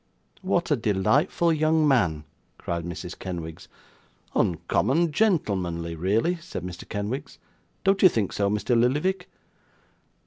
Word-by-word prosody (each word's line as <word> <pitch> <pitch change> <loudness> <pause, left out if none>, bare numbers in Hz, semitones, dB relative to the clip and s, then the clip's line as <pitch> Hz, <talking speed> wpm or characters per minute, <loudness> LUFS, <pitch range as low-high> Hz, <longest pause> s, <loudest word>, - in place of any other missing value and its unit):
'What 175 -3 0
a - - +5
delightful 120 - +2
young 155 0 +2
man!' 90 - +2 0.3
cried 85 -1 -3
Mrs. 85 -1 -7
Kenwigs. 85 -3 -6 0.7
'Uncommon 125 - +1
gentlemanly, 95 - 0
really,' 105 - +1
said 165 - -7
Mr. 90 -1 -8
Kenwigs. 105 +6 -4 0.5
'Don't 195 +1 +2
you 185 - +8
think 110 - -1
so, 100 -1 +1
Mr 105 +4 0
Lillyvick? 150 +11 +1
115 Hz, 115 wpm, -25 LUFS, -, 0.7 s, you